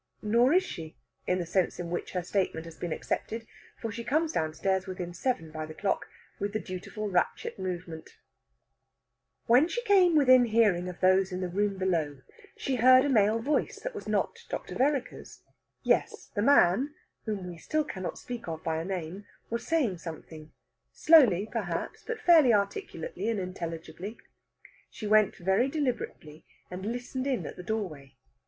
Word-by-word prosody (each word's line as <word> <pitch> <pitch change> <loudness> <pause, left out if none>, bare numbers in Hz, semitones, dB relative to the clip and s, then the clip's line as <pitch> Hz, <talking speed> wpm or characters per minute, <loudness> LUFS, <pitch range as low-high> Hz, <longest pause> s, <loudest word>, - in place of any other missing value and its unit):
Nor 235 +5 +4
is 370 +1 +5
she, 160 -1 -8 0.3
in 180 - +2
the 175 - -2
sense 180 +2 0
in 170 -1 -5
which 175 - -4
her 180 -1 -1
statement 180 -3 -1
has 165 -1 -10
been 175 0 -5
accepted, 225 +7 -3 0.3
for 225 - -4
she 235 +2 -6
comes 310 +6 +1
downstairs 190 - -1
within 180 -2 -5
seven 175 -5 -2
by 155 0 -5
the 155 - -10
clock 195 - -1 0.3
with 200 0 -2
the 215 - 0
dutiful 195 +3 -6
ratchet 180 0 -1
movement. 175 -3 -6 1.3
When 250 +7 +5
she 485 +7 -3
came 380 -6 +5
within 255 -4 +6
hearing 210 -6 +2
of 180 - -10
those 185 +1 +4
in 180 - -3
the 185 - -2
room 200 +2 0
below, 160 -7 -1 0.4
she 265 -2 -1
heard 255 +3 +7
a - - +1
male 215 -3 +4
voice 275 +7 -1
that - - -4
was 420 - -8
not - - 0
Dr. - - -5
Vereker's. 275 -1 -2 0.4
Yes, - - 0
the 205 - -1
man 270 - +4 0.3
(whom 210 -4 -3
we 175 -2 -8
still 310 - 0
cannot 185 -10 -5
speak 245 -4 -7
of 160 -1 -5
by 160 -1 -1
a 160 - -2
name) 185 +1 -5 0.2
was 235 0 -3
saying 260 - +1
something 160 -2 -9 0.4
slowly, 235 - +5
perhaps 180 -8 -3
but 455 -2 -5
fairly 320 -8 +6
articulately 225 - -1
and 225 -3 0
intelligibly. 180 +3 -6 0.7
She 220 - -8
went 215 -1 +4
very 190 +8 +2
deliberately, 245 - -4 0.2
and 185 +3 -5
listened 245 +3 -3
in 255 -10 0
the - - -6
doorway. 180 -9 -4
200 Hz, 165 wpm, -29 LUFS, 175-250 Hz, 1.3 s, heard